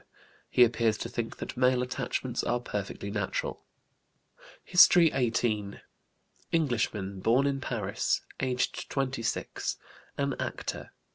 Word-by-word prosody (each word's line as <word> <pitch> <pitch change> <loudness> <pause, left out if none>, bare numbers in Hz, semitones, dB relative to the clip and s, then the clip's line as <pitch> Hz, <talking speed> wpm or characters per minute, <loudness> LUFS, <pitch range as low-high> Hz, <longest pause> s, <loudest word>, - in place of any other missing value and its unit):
He 125 - +6
appears 115 -2 +2
to - - -5
think 115 -1 -4
that - - -6
male 125 0 +3
attachments 125 0 -2
are 120 - 0
perfectly 100 -3 -5
natural. 100 -3 -2 1.0
HISTORY 175 -2 +7
XVIII. 115 -5 0 0.7
Englishman, 110 - 0
born 120 +8 +3
in 140 -1 0
Paris; 105 -7 -1 0.2
aged 125 -1 -1
26; 130 -4 -2 0.4
an 140 -1 0
actor. - - -4
120 Hz, 110 wpm, -29 LUFS, 110-130 Hz, 1.0 s, HISTORY